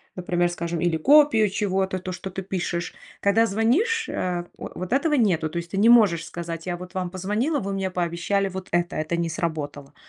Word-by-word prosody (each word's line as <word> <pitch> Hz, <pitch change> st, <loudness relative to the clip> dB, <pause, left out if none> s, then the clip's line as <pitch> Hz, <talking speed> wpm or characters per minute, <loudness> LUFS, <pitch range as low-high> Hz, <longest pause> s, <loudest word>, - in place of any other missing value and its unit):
например, 175 Hz, -1 st, 0 dB
скажем, 170 Hz, -1 st, -3 dB
или 175 Hz, -1 st, +1 dB
копию 250 Hz, -, +5 dB
чего-то, 190 Hz, -1 st, -1 dB
то 185 Hz, 0 st, -5 dB
что 190 Hz, -, -6 dB
ты 190 Hz, -, -5 dB
пишешь. 175 Hz, -2 st, -3 dB, 0.3 s
Когда 215 Hz, +3 st, +3 dB
звонишь, 310 Hz, -, +1 dB
э, 175 Hz, -1 st, -2 dB
во -, -, -7 dB
вот 185 Hz, +6 st, -4 dB
этого 295 Hz, +2 st, +2 dB
нету, 175 Hz, -, +2 dB
то 170 Hz, -, -6 dB
есть 170 Hz, 0 st, -5 dB
ты 195 Hz, -, -3 dB
не 220 Hz, +3 st, +5 dB
можешь 200 Hz, -9 st, +5 dB
сказать: 170 Hz, -1 st, -6 dB
"Я 175 Hz, -1 st, -3 dB
вот 180 Hz, +1 st, -10 dB
вам 185 Hz, -1 st, -2 dB
позвонила, 210 Hz, -, -1 dB
вы 195 Hz, 0 st, -3 dB
мне 190 Hz, -1 st, -2 dB
пообещали 180 Hz, +3 st, 0 dB
вот 190 Hz, 0 st, -7 dB
это, 175 Hz, 0 st, 0 dB
это 155 Hz, +2 st, -1 dB
не 170 Hz, 0 st, 0 dB
сработало". 145 Hz, -4 st, -4 dB
185 Hz, 200 wpm, -24 LUFS, 170-205 Hz, 0.3 s, копию